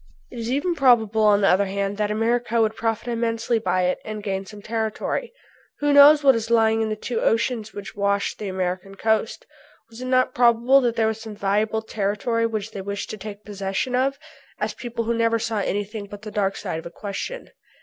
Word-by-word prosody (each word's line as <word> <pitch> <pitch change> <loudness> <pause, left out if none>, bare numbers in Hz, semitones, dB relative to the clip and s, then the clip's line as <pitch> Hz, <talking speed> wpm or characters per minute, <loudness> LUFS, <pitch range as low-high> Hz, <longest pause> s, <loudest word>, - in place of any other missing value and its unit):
It 240 - -8
is 230 0 -4
even 290 +7 0
probable 235 -7 +3
on 210 -1 +5
the 195 - +4
other 195 +2 +3
hand 200 +1 -2
that 210 -1 0
America 230 +2 0
would 220 -1 +2
profit 225 +1 -2
immensely 230 0 0
by 185 -3 0
it 180 0 0
and 215 -1 -6
gain 195 -1 -3
some 210 +1 -10
territory. 225 - -2 0.5
"Who 290 0 +1
knows 290 +1 +8
what 270 -1 +7
is 230 -1 -3
lying 225 -1 +3
in 220 - 0
the 215 - -1
two 225 +2 -3
oceans 225 -1 0
which 205 0 -8
wash 200 0 0
the 210 - -6
American 185 +1 -3
coast? 220 +1 0 0.5
Was 230 +2 -11
it - - -4
not 255 0 +2
probable 240 +3 +4
that 240 -2 0
there 225 -1 +2
was 220 0 -1
some 220 -2 -8
valuable 210 +2 0
territory 220 +2 -1
which 220 -1 -4
they 200 - -6
wished 200 +1 -5
to 215 - -6
take 205 0 -9
possession 200 +4 -3
of?" 270 +2 +1 0.4
asked - - -3
people 235 -1 -3
who 235 +1 0
never 230 0 +2
saw 225 -1 -2
anything 205 +1 -3
but 205 +1 -11
the 215 - -7
dark 200 -2 0
side 160 - -4
of 165 - -8
a - - -8
question. 205 - -6
220 Hz, 210 wpm, -23 LUFS, 200-235 Hz, 0.5 s, knows